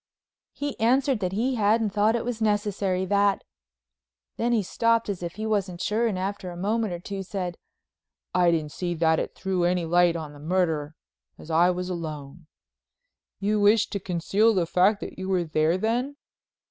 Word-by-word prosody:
He 285 -1 -5
answered 255 +2 +2
"that 185 -3 -2
he 245 +5 0
hadn't 215 0 +2
thought 210 +3 +2
it 235 - -2
was 240 -2 -4
necessary—that——" 200 -1 +1 0.9
then 235 +1 0
he 225 -3 +2
stopped 230 +3 +1
as 195 -3 -3
if 170 -1 -4
he 215 +2 -4
wasn't 195 -5 -1
sure 220 +5 +1
and 205 -4 -2
after 195 0 -4
a 175 - -8
moment 215 +3 0
or 175 - -4
two 195 +2 -5
said: 185 -2 -4 0.8
"I 180 -1 +4
didn't 155 -3 0
see 175 +2 -3
that 160 -1 +2
it - - -4
threw 190 -2 -1
any 175 0 +1
light 175 +1 +3
on 155 -3 -6
the 145 - -13
murder, 160 -2 -1 0.4
as 165 - -10
I 170 +3 +4
was 180 0 -2
alone." 155 -3 -6 0.9
"You 210 +2 +1
wished 210 +2 +4
to 200 - -2
conceal 195 +5 +1
the 180 -3 +2
fact 190 +5 +2
that - - -7
you 190 0 -4
were 185 -2 +2
there, 155 +1 +1
then?" 240 +7 -1
190 Hz, 180 wpm, -26 LUFS, 175-215 Hz, 0.9 s, I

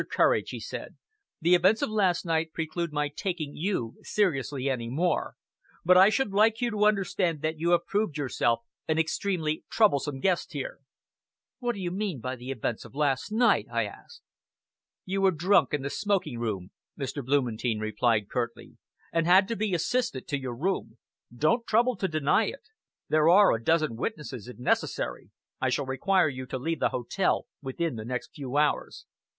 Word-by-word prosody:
Courage," - - +2
he - - -5
said, - - -7 0.5
"the 170 +3 +4
events 185 +5 +4
of - - -1
last 190 -6 +1
night 160 -1 0
preclude 165 +1 -3
my 150 0 0
taking 155 -1 -4
you 160 - -2
seriously 140 - 0
any 120 -4 -2
more; 165 +6 0 0.5
but 180 +1 +6
I 190 +2 +8
should 220 -1 0
like 220 +2 +4
you 240 -1 0
to 210 -1 +2
understand 190 -6 +1
that 155 0 -1
you 170 +2 +1
have 175 0 +3
proved 200 -6 -1
yourself 120 -4 0 0.3
an 160 - +1
extremely 160 -1 -1
troublesome 145 -10 +2
guest 185 +3 0
here." - - -5 0.8
"What 240 -2 -1
do - - -7
you 180 -2 -2
mean 190 -6 -2
by 130 +3 -4
the 125 +1 -9
events 120 -3 -3
of - - -14
last 145 +4 0
night?" 235 +3 +3
I - - +1
asked. 470 0 -12 0.8
"You 195 +1 -1
were 195 - +5
drunk 175 -2 +3
in 145 -2 -1
the 140 - -2
smoking 195 - -1
room," 100 -5 -3 0.3
Mr. 140 0 -4
Blumentein 120 -4 0
replied 110 0 +1
curtly, 120 -2 -4 0.4
"and 165 0 +1
had 190 +2 +6
to 230 - -1
be 210 -4 0
assisted 175 - -1
to 145 - -1
your 125 -2 -4
room. 150 -5 -2 0.3
Don't 155 - +1
trouble 240 +3 +3
to 190 - 0
deny 155 +5 +2
it. 275 - -6 0.5
There 155 +1 +4
are 200 +3 +7
a 115 - -3
dozen 155 -5 +2
witnesses, 135 - -5
if 125 - -10
necessary. 125 - -1 0.3
I 130 - +2
shall 135 +2 0
require 165 +8 +2
you 130 -2 -5
to 130 - -3
leave 165 +6 -2
the - - +2
hotel 125 +10 0 0.2
within 145 +1 -3
the 110 - -6
next 125 +1 -4
few 140 -2 -4
hours." 150 0 0
155 Hz, 180 wpm, -28 LUFS, 130-195 Hz, 0.8 s, I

